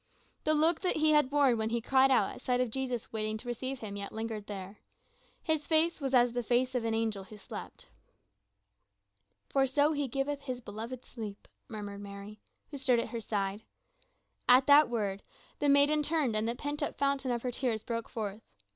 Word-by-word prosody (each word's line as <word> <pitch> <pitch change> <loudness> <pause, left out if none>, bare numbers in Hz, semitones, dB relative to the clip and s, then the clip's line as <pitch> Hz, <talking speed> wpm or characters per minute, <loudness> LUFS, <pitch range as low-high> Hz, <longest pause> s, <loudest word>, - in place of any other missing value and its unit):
The 310 - +3
look 320 +2 +3
that 365 - 0
he 310 0 +3
had 295 -3 +4
worn 275 -5 +4
when 220 0 0
he 235 +1 0
cried 265 +3 +4
out 260 - +3
at - - -11
sight 250 -1 0
of 250 -3 0
Jesus 250 -3 -3
waiting 215 0 -2
to 235 - -10
receive 255 +2 -4
him 205 -2 -6
yet 200 0 -5
lingered 220 -2 -5
there, 195 0 -7 0.6
his 315 -2 0
face 320 0 +3
was 270 -1 -1
as 245 -2 +4
the 245 - 0
face 250 +2 +1
of 250 -2 0
an 225 -1 0
angel 220 -4 -1
who 210 +2 -12
slept. 200 - -9 1.6
"For 270 -1 +2
so 285 +3 +3
he 290 -2 -1
giveth 275 +3 -2
his 255 -3 -4
beloved 230 +3 -7
sleep," 215 -4 -8 0.2
murmured 205 -2 -7
Mary, 200 +1 -9 0.3
who 285 - -6
stood 255 -2 +3
at 230 - -1
her 235 -2 -4
side. 200 -1 -2 0.9
At 255 +1 +7
that 290 -1 +7
word 205 -4 -2 0.4
the 290 - +2
maiden 285 +2 +5
turned 295 -6 +1
and 215 +1 +1
the 235 - -2
pent 290 +3 -4
up 290 - -2
fountain 275 -1 0
of 240 -1 -1
her 250 - -1
tears 235 -3 -1
broke 230 -1 -4
forth. 215 -3 -4
245 Hz, 200 wpm, -31 LUFS, 220-280 Hz, 1.6 s, At